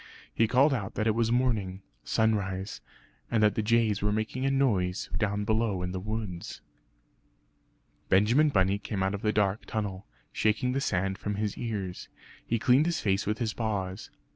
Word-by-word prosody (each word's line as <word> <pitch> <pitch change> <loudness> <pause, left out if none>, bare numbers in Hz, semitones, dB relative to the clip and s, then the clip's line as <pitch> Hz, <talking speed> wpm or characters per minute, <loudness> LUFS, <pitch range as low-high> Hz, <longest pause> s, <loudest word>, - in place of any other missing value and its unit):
He 115 - +3
called 135 +5 +4
out 100 -7 -3
that 110 - 0
it 110 - +3
was 115 0 +1
morning 110 -7 0 0.2
sunrise; 100 -3 0 0.5
and 110 -2 +2
that 105 - +4
the - - 0
jays 110 -2 +2
were 105 0 +1
making 110 +5 -1
a - - +3
noise 115 -7 +1
down 105 -1 0
below 110 -4 0
in 90 - -3
the 95 - -3
woods. 105 -3 -5 1.5
Benjamin 115 +11 +4
Bunny 95 -5 +2
came 100 -2 -3
out 95 +1 0
of 100 - -4
the 105 - +1
dark 105 -1 0
tunnel, 100 -3 -4 0.3
shaking 110 +4 +1
the 135 +2 -1
sand 95 -2 -1
from 105 0 -3
his 105 0 -2
ears; 100 -6 -4 0.3
he 115 - 0
cleaned 130 +7 +4
his 170 - 0
face 100 -1 0
with 105 +1 0
his 110 -3 -2
paws. 100 -4 -3
105 Hz, 175 wpm, -28 LUFS, 95-115 Hz, 1.5 s, called